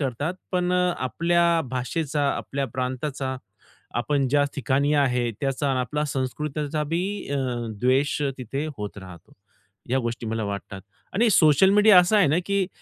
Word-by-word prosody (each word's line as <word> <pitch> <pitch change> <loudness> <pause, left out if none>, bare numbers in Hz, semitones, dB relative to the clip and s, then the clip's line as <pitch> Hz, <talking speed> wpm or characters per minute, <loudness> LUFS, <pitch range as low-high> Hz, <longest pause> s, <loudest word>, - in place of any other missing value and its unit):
करतात. 145 +6 -2 0.2
पण 180 0 +1
अ, 180 -1 +2
आपल्या 170 +5 +2
भाषेचा 145 +3 -2
आपल्या 140 0 -3
प्रांताचा, 130 +1 -3 0.6
आपण 140 +1 0
ज्या 145 +1 +3
ठिकाणी 140 +2 +1
आहे, 125 -4 +2
त्याचा 135 0 -1
अन 130 - 0
आपल्याला 150 +5 -1
संस्कृतीचा 150 +3 -2
बी 165 +4 -1 0.3
अ, - - 0 0.4
द्वेष 135 +4 +2 0.2
तिथे 135 +5 -4
होत 105 -1 -6
राहतो. 90 -3 -13 0.6
या 135 - +2
गोष्टी 115 -1 -4
मला 110 -1 -2
वाटतात, 100 -1 -6 0.3
आणि 230 +3 +3
सोशल 165 +1 +5
मीडिया 210 -1 +7
असा 180 +4 +4
आहे 195 - +5
ना 155 +4 +2
की 200 -2 +1
140 Hz, 150 wpm, -24 LUFS, 125-165 Hz, 0.6 s, मीडिया